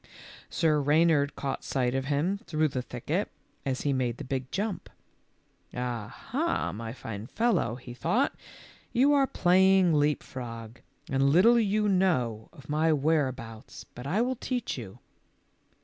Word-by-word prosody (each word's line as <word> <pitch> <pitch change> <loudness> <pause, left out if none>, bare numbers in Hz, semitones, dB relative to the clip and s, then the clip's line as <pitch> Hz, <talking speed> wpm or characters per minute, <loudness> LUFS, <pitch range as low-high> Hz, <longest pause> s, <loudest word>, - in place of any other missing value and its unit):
Sir 155 -3 +2
Eeynard 150 -1 +3
caught 135 -1 -4
sight 125 -2 0
of 135 0 -1
him 150 +8 0
through 155 -1 +1
the 130 -2 -3
thicket - - -3 0.4
as 130 -1 -1
he 145 - +1
made 125 -3 -1
the - - -6
big 130 -1 -3
jump. 205 0 -3 0.5
" - - -39
Ah, 120 -4 -3 0.2
ha, 320 +7 0
my 110 +1 -6
fine 115 -3 -7
fellow," 215 - +1
he 125 -1 -10
thought, 225 - +1 0.6
"you 275 +4 +4
are 275 -2 +4
playing 185 -2 +4
leap 150 -1 +2
frog, 115 -2 -8 0.3
and 135 -2 +2
little 220 +11 +6
you 210 -1 +1
know 130 - +1
of 140 -1 -15
my 155 +2 +2
where 150 0 +2
abouts, 115 -3 -9
but 125 +2 -8
I 200 +10 +2
will 255 0 -1
teach 250 -1 -3
you." 110 -7 -8
145 Hz, 155 wpm, -28 LUFS, 125-190 Hz, 0.6 s, little